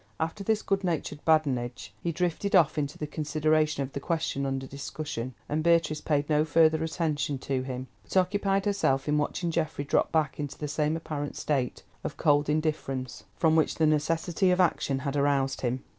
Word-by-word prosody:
After 165 +6 -2
this 215 +1 +1
good 195 0 0
natured 155 -4 -2
badinage, 125 -9 +1
he 170 - -1
drifted 180 +4 0
off 160 -4 +4
into 145 0 -3
the 150 - -3
consideration 155 -1 +1
of 135 - -7
the - - -3
question 140 -3 -1
under 135 0 -2
discussion, 140 -2 -5
and 150 +2 -1
Beatrice 165 -2 +3
paid 145 -2 0
no 150 -1 +3
further 160 0 +4
attention 155 -3 -1
to 130 0 -2
him, 130 0 -5 0.2
but - - -3
occupied 195 +1 +2
herself 175 -10 +1
in 150 0 +2
watching 170 +3 -1
Geoffrey 155 -3 -1
drop - - +1
back 155 -1 0
into 145 -2 -4
the 150 - -4
same 150 +2 0
apparent 145 -3 -4
state 135 -4 -1 0.2
of - - -5
cold 145 0 +3
indifference, 150 -5 -2
from 160 -1 +3
which 160 - +2
the 160 - +2
necessity 165 +4 +1
of 180 0 +2
action 155 -6 +2
had 140 0 -1
aroused 140 -2 +1
him. 125 +1 -1
150 Hz, 185 wpm, -28 LUFS, 140-165 Hz, 0.2 s, off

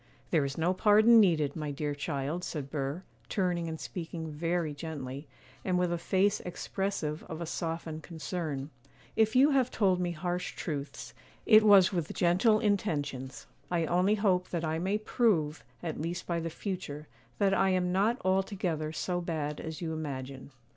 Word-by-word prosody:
'There 160 -4 +3
is 140 0 -4
no 170 +3 +2
pardon 215 +4 +6
needed, 160 -8 +3
my 150 -2 -3
dear 145 +1 -2
child,' 145 +4 -3
said 140 -6 -5
Burr, 145 +4 -3 0.3
turning 175 -4 0
and 160 -1 -5
speaking 165 -2 -5
very 165 0 -1
gently, 145 -2 -6 0.4
and 180 -1 +1
with 180 -1 +1
a - - 0
face 195 +4 +2
expressive 175 -3 -3
of 160 - -7
a 170 - -3
softened 165 -1 -4
concern; 155 -3 -4 0.4
'if 220 +1 +3
you 275 +4 +6
have 260 -3 +3
told 190 -6 +2
me 175 - 0
harsh 175 +2 -3
truths, 145 -3 -5 0.3
it 215 -1 +8
was 200 -2 +7
with 170 -4 -2
gentle 190 +5 +4
intentions; 145 - -1 0.2
I 170 -2 +1
only 180 +5 +3
hope 190 -4 +1
that 170 -2 -2
I 160 +1 -1
may 190 +4 0
prove, 190 - +1 0.2
at - - -3
least 170 +2 -3
by 170 -1 -1
the 165 0 -3
future, 160 -5 -5 0.3
that 195 -2 +3
I 195 0 +3
am 180 -1 +1
not 210 +7 +2
altogether 185 -5 0
so 175 +2 -2
bad 150 -3 -3
as 160 +2 -6
you 160 -1 -2
imagine. 135 -4 -5
170 Hz, 170 wpm, -30 LUFS, 155-190 Hz, 0.4 s, it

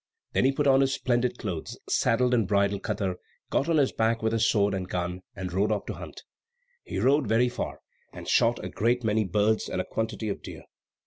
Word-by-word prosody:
Then - - +3
he 135 - +5
put 145 +2 -1
on 135 -1 +5
his 135 0 +2
splendid 125 -1 0
clothes, 90 -7 -5
saddled 125 +2 +2
and 115 -5 +2
bridled 100 -1 +1
Katar, 95 -3 -2 0.3
got 145 - +1
on 165 - +3
his 140 -3 +3
back 115 0 0
with 110 0 +1
his 115 0 +3
sword 100 -2 +2
and 95 -1 -3
gun, 90 0 -3
and 90 -2 -5
rode 100 +3 +1
off 105 -2 -1
to - - -4
hunt. - - -9 0.6
He - - -5
rode 140 -1 +3
very 115 +3 +3
far, - - -5 0.3
and - - -10
shot - - +2
a - - -4
great 120 +3 0
many 110 -1 +1
birds 105 +4 +1
and - - -2
a 90 - -1
quantity 110 0 -3
of 100 - -4
deer. - - -9
110 Hz, 215 wpm, -27 LUFS, 100-125 Hz, 0.6 s, he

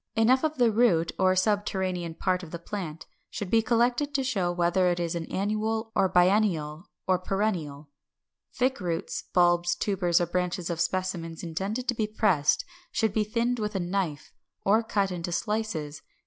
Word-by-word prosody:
Enough 250 +5 +4
of 310 -2 0
the 240 -3 +4
root 200 -8 +3
or 185 0 +4
subterranean 185 -4 0
part 185 0 0
of 175 - -9
the 170 - -5
plant 170 -3 -6 0.2
should 200 -3 -5
be 225 - +5
collected 245 +5 +1
to 270 - +2
show 195 -9 0
whether 175 +1 +2
it 175 0 0
is 170 -1 -1
an 170 -1 -5
annual, 220 +3 -1
a 190 - +3
biennial, 180 -4 +2 0.2
or 185 -1 +3
a - - -16
perennial. 170 -8 -2 0.6
Thick 260 +1 0
roots, 170 -2 -3
bulbs, 175 -1 +3
tubers, 180 -2 +1
or 175 - +1
branches 180 0 -2
of 170 0 -2
specimens 175 -3 -2
intended 195 +9 -3
to 245 - +2
be 220 -2 -1
pressed 190 -9 +2 0.3
should 220 -3 0
be 215 - +2
thinned 235 +3 -1
with 210 -1 -3
a - - +1
knife, 175 -4 -3 0.3
or 215 +3 +4
cut 200 -4 0
into 175 -1 -4
slices. 175 -7 -2
185 Hz, 175 wpm, -27 LUFS, 175-220 Hz, 0.6 s, be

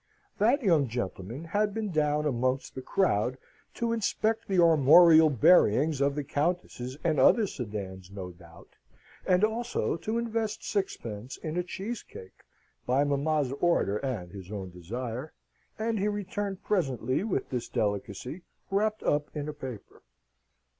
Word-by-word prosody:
That 245 +7 +3
young 165 - +3
gentleman 115 - -5
had 205 +5 0
been 215 -3 -2
down 150 -1 +1
amongst 130 -1 -1
the 130 - -6
crowd 130 - +1 0.4
to 235 -1 -1
inspect 220 0 0
the 195 - 0
armorial 160 0 +7
bearings 140 - +4
of 140 0 +2
the 145 - -2
Countess's 145 -4 -2
and 160 -4 +1
other 215 - +5
sedans, 100 - -6
no 95 -2 -7
doubt, 85 -1 -16 0.6
and 180 +2 +3
also 225 -4 0
to 220 +6 -2
invest 225 -2 -2
sixpence 120 - -3
in 155 0 -5
a 180 - +1
cheese 200 +6 -5
cake, 95 - -13 0.5
by 130 +3 +3
mamma's 145 -1 0
order 170 - +2
and 105 -9 -4
his 95 0 -10
own 95 -3 -5
desire, 120 - -6 0.4
and 220 0 -1
he 200 - +1
returned 205 -1 -3
presently 135 - 0
with 200 -11 -2
this 125 -2 -3
delicacy 105 - -3 0.3
wrapped 215 +2 0
up 145 0 +1
in 150 -1 -3
a 150 - -4
paper. 130 -7 -9
150 Hz, 145 wpm, -28 LUFS, 120-195 Hz, 0.6 s, armorial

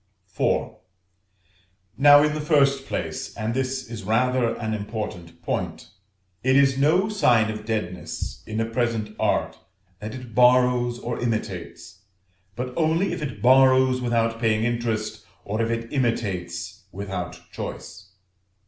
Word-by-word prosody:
IV. - - +1 1.2
Now, 145 +1 +7
in 150 0 +1
the 155 - -3
first 140 -3 +2
place - - -4
and 110 +2 -2
this 130 0 -2
is 115 -1 -7
rather 120 +3 +1
an 110 -1 -3
important 105 -5 -6
point - - -3 0.5
it 130 +3 +2
is 135 -1 +5
no 160 +9 +3
sign 120 - +3
of 105 0 -7
deadness 105 -5 -4
in 110 0 -3
a 115 - +1
present 115 -2 -2
art - - 0 0.4
that 110 +2 -6
it 125 -3 -10
borrows 125 0 +4
or 120 -1 -4
imitates, 100 -5 -4 0.5
but 125 +2 -4
only 165 +4 +1
if - - -5
it 130 -8 -5
borrows 130 0 +5
without 115 -2 0
paying 110 -1 +1
interest, 115 -2 -2 0.2
or 105 +3 -2
if 115 - 0
it 115 +2 -3
imitates 95 -7 -2
without 95 -2 -5
choice. 95 0 -8
115 Hz, 135 wpm, -24 LUFS, 110-130 Hz, 1.2 s, Now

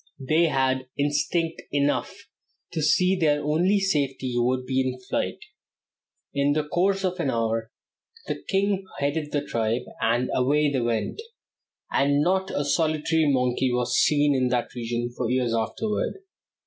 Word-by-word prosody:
They 160 +4 +4
had 130 -3 0
instinct 150 +3 0
enough 145 0 +1 0.6
to 165 - -2
see 180 +5 +3
that - - -6
their 150 -1 +2
only 175 +7 +2
safety 140 -9 -1
would 125 +1 +1
be 130 0 +1
in 130 -1 -2
flight. 125 - -2 1.0
In 140 0 +2
the 155 0 0
course 190 +4 +1
of 185 -1 -1
an 155 -5 0
hour 115 -1 -1 0.6
the - - -4
king 195 0 +1
headed 150 +1 -1
the 145 - -1
tribe, 115 +1 -1 0.2
and 120 +2 +1
away 145 +3 +2
they 130 -3 0
went, 115 - -1 0.7
and 140 +1 +2
not 190 +3 +1
a 145 - -2
solitary 155 0 +1
monkey 125 0 +1
was 125 0 0
seen 145 -1 +3
in 130 -2 +2
that 125 -1 -1
region 120 0 -3
for 120 -3 -2
years 125 -2 +1
afterward. 210 - -2
140 Hz, 150 wpm, -25 LUFS, 125-160 Hz, 1.0 s, They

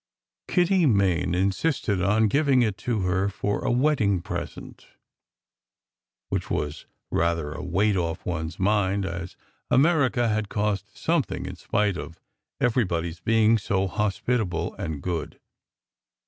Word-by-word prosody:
Kitty 180 -2 +3
Main 95 -6 +2
insisted 100 - 0
on 105 +4 +3
giving 135 +2 +3
it 105 -4 0
to 115 -4 -1
her 90 +2 +1
for 100 +2 -2
a - - 0
wed 140 +4 +2
ding 100 -3 +2
present; - - -7 1.4
which - - -2
was 75 0 -3 0.2
rather 85 -3 0
a - - -6
weight 100 +4 +1
off 85 -3 -2
one 80 -3 -2
s 80 - -9
mind, 100 0 +1
as 90 -1 -5 0.3
America 135 -5 +3
had 110 -1 -1
cost 105 -2 -2
something - - 0
in - - -6
spite 105 -3 0
of 85 0 -8 0.4
everybody 95 -9 +1
s 85 - -12
being 110 +4 +3
so 95 -1 0
hospitable 105 0 -1
and 75 -3 -5
good. 85 -3 -3
100 Hz, 135 wpm, -25 LUFS, 90-115 Hz, 1.4 s, Kitty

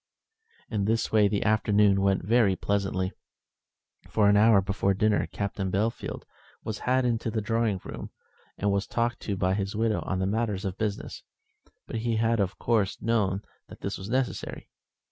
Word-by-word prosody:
In 105 -3 0
this 115 +1 0
way 105 -2 +5
the 100 0 0
afternoon 105 -2 +3
went 95 -2 +1
very 110 -3 +4
pleasantly. 95 -1 -1 1.0
For 105 -2 +3
an 100 - +5
hour 110 0 +6
before 100 0 0
dinner 105 +1 +2
Captain 100 -1 -3
Bellfield 110 +5 -2 0.4
was 110 -1 -4
had 130 0 +3
into 115 -1 0
the 110 0 -1
drawing 110 -2 0
room - - -7 0.5
and 100 0 +1
was 100 0 0
talked 120 0 -1
to 100 -2 -3
by 95 +1 +1
his 100 0 -2
widow 110 0 +1
on 95 0 -1
matters 105 -3 -1
of 95 -1 -4
business; 105 -2 -3 0.6
but - - -5
he 115 0 -1
had 115 +1 +2
of 95 -2 -1
course 110 -5 0
known 105 -4 0 0.2
that - - -13
this - - -3
was 95 +2 -7
necessary. 130 +1 -2
105 Hz, 165 wpm, -27 LUFS, 100-115 Hz, 1.0 s, hour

